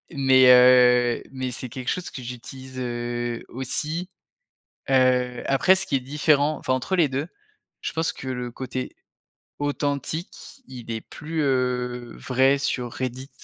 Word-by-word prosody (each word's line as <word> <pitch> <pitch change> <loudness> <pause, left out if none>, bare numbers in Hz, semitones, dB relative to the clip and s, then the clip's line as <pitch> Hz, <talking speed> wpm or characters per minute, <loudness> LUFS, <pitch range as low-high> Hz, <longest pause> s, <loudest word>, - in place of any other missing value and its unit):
mais 130 -1 +5
heu, 125 -1 +6
mais 130 -1 -3
c'est 125 +1 -6
quelque 130 +2 -8
chose 180 - -2
que 130 - -7
j'utilise, 130 +2 -9
heu, 120 -1 -3
aussi. 155 +8 -3 0.8
Heu, 125 -1 +2
après 140 +8 +4
ce 190 - -2
qui 140 - +1
est - - -1
différent, 145 +2 +1
enfin, 130 - -1
entre 160 +9 -1
les 160 -5 +4
2 135 +4 -2 0.6
je - - -3
pense 160 0 0
que 130 - -8
le 125 -1 -4
côté 130 0 -5 0.7
authentique, 145 - -4
il 120 -3 -8
est 110 -1 -3
plus, 160 +1 -5
heu, 125 -3 -1
vrai 135 +2 +2
sur 125 -3 -2
Reddit 130 +1 -5
130 Hz, 145 wpm, -24 LUFS, 125-140 Hz, 0.8 s, heu